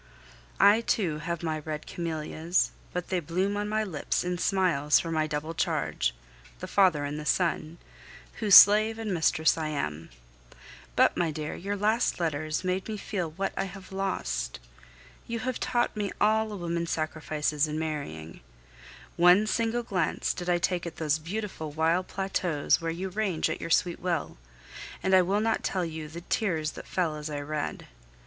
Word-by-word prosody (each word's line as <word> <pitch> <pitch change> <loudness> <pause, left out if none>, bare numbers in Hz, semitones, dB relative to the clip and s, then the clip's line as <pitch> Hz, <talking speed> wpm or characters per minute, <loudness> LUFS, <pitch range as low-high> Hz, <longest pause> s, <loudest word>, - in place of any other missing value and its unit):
I 210 +3 +6
too 175 -9 0
have 170 +1 -4
my 160 -1 -1
red 155 0 -5
camellias, 165 +1 -1 0.2
but 180 -1 -4
they 185 - +1
bloom 185 +5 -1
on 205 0 -2
my 215 0 +1
lips 175 -8 -2
in 180 0 -2
smiles 175 -7 +3
for 165 - -4
my 155 -1 +1
double 150 +2 -3
charge - - -1 0.4
the - - -6
father 180 -8 +3
and 145 +1 -4
the - - -5
son 170 -2 0 0.6
whose 210 -4 +6
slave 215 +2 +8
and 220 -3 -3
mistress 160 -1 +2
I 155 - -1
am. 80 - -3 0.9
But, - - +4
my 170 -2 +1
dear, 155 0 -4
your 200 +3 -4
last 215 +2 +1
letters 155 0 -1
made 185 +1 -1
me 215 -1 -4
feel 185 -5 -3
what 195 +5 -3
I - - -1
have 195 0 -10
lost! 60 - -2 0.7
You 230 - -2
have 255 0 -2
taught 240 -1 0
me 205 -2 -2
all 220 0 +2
a 205 - -5
woman 170 -1 -2
sacrifices 155 -1 -1
in 150 0 -3
marrying. 140 - -5 0.8
One 180 +4 +6
single 230 +2 0
glance 190 -6 -1
did 180 0 -5
I 175 - +4
take 175 0 -1
at 170 - -7
those 155 -1 0
beautiful 180 -1 -5
wild 165 +4 +1
plateaus 180 -6 0
where 165 - -2
you 180 +4 -3
range 185 -5 -1
at - - -4
your 165 - -4
sweet 170 +1 +2
will, 170 - -2 0.6
and 190 - +1
I 185 - +8
will 195 +4 +1
not 225 0 +1
tell 185 -2 -1
you 160 -1 -6
the 165 +3 -8
tears 165 -5 -1
that - - -10
fell 170 -4 -1
as 150 0 -5
I 145 -1 -3
read. 150 0 -4
170 Hz, 175 wpm, -28 LUFS, 155-195 Hz, 0.9 s, slave